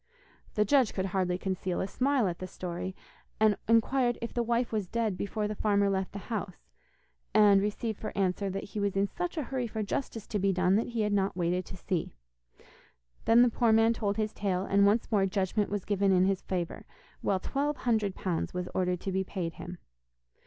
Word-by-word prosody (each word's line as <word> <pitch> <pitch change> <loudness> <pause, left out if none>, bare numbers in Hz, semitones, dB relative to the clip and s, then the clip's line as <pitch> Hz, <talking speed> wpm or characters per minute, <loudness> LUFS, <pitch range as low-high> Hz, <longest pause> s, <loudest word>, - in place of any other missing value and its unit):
The 210 - +3
judge 260 -1 +3
could 190 - 0
hardly 180 -2 +1
conceal 185 -1 -2
a - - 0
smile 255 0 +1
at 175 -2 -3
the 185 - -5
story, 180 +1 -5 0.4
and 215 -1 +5
inquired 240 +2 +3
if 235 - -5
the 240 - 0
wife 235 +1 0
was 210 -4 -1
dead 225 -1 -1
before 210 +2 -2
the 210 - -3
farmer 200 -1 +2
left 190 -1 -1
the 200 +4 -6
house, 200 -4 -5 0.6
and 205 -2 +6
received 210 +1 -2
for - - -4
answer 195 +1 0
that 195 +1 -4
he 210 - -6
was 200 -1 0
in 195 - +3
such 350 - -4
a 305 - 0
hurry 255 -2 -2
for 220 -1 -3
justice 225 0 -3
to 210 - -2
be 195 +1 +2
done 185 0 +2
that 225 - 0
he 235 -2 -2
had 210 -1 +1
not 195 -1 0
waited 180 +1 0
to - - -9
see. 175 -1 -3 1.1
Then 235 +2 +7
the 245 - +4
poor 230 0 +2
man 225 +1 +5
told 205 -2 -2
his 215 -1 -1
tale, 190 -2 -1
and 200 0 +4
once 220 +4 +1
more 200 -3 +3
judgment 195 +2 0
was 205 -2 -3
given 200 -1 +2
in 185 0 +4
his 195 -1 +1
favour, 175 -3 -4 0.3
while 190 - +1
twelve 285 +7 -1
hundred 215 -5 0
pounds 180 -1 -2
was 180 0 -2
ordered 180 -1 0
to 195 - -3
be 190 0 0
paid 180 -3 -4
him. 180 +1 -8
200 Hz, 210 wpm, -30 LUFS, 185-225 Hz, 1.1 s, Then